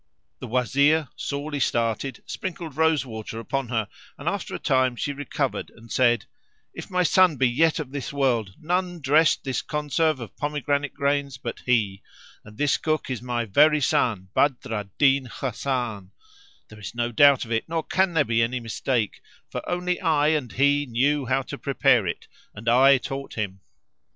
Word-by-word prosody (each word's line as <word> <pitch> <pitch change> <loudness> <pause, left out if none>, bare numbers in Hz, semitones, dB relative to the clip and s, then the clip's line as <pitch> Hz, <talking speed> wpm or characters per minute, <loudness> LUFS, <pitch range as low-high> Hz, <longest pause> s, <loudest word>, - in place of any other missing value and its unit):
The - - -7
Wazir, 140 +5 +2
sorely 145 +1 -4
started, 120 +2 -1
sprinkled 170 -5 -6
rose 160 -2 +2
water 110 -1 -7
upon 135 +2 -3
her 110 -4 -1 0.3
and - - -9
after - - -2
a - - -2
time 130 -1 +1
she 145 +4 -3
recovered 145 -1 -3
and 115 0 -17
said, 120 -3 +3 0.5
"If - - -8
my 180 -1 +1
son 180 0 +4
be 130 0 +3
yet 155 +7 +2
of 150 -5 -5
this 140 -2 -5
world, 120 -9 0
none 175 +1 -1
dressed 155 +3 +3
this 135 -2 -2
conserve 150 0 0
of 115 - -9
pomegranate 145 -1 -1
grains 140 -1 0
but - - -6
he; 105 -6 +1 0.4
and 105 0 -14
this 145 -1 +2
Cook 155 -4 -1
is 125 - -3
my 120 -1 -2
very 150 +9 +4
son 105 -8 0
Badr 135 -5 +1
al 105 -2 -4
Din 135 -2 +3
Hasan; 115 -5 -3 0.6
there 110 - -13
is 100 +1 -8
no 120 0 -1
doubt 140 +2 +5
of 115 - -11
it 115 +6 -1
nor 165 -1 -1
can 190 0 +1
there 150 -3 +4
be 115 -1 +1
any 120 +2 0
mistake, 115 -1 -2 0.3
for - - -3
only 180 +1 -1
I 155 -4 +3
and 150 -6 0
he 145 +2 +2
knew 135 +3 +1
how 135 +2 +1
to - - -8
prepare - - +2
it - - -5 0.3
and 105 +2 -10
I 135 +3 +6
taught 135 +2 -6
him." 95 -3 -4
135 Hz, 175 wpm, -24 LUFS, 115-150 Hz, 0.6 s, I